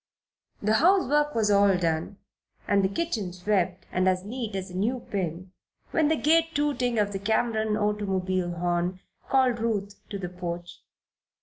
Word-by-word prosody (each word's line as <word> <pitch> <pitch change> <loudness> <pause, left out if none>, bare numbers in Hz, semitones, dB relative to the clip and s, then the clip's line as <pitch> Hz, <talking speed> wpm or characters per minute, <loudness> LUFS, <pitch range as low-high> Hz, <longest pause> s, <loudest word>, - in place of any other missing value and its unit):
The 215 +2 +2
housework 295 -5 +3
was 215 -2 +2
all 200 -2 +5
done 165 +2 -1 0.5
and 200 -1 +3
the 190 - +2
kitchen 215 - -2
swept 185 -1 -1
and 185 +1 +2
as 185 0 0
neat 225 -2 -4
as 190 -1 -4
a - - -9
new 230 +7 0
pin 180 -1 -3 0.4
when 315 -2 +3
the 320 - +3
gay 325 +2 +3
tooting 275 -5 0
of 205 -1 +1
the 195 - -3
Cameron 220 +1 +1
automobile 190 -4 0
horn 175 +1 -1 0.3
called 255 -3 +3
Ruth 205 -3 -1 0.2
to 200 - -4
the 180 -2 -5
porch. 175 -1 -6
200 Hz, 160 wpm, -27 LUFS, 185-235 Hz, 0.5 s, all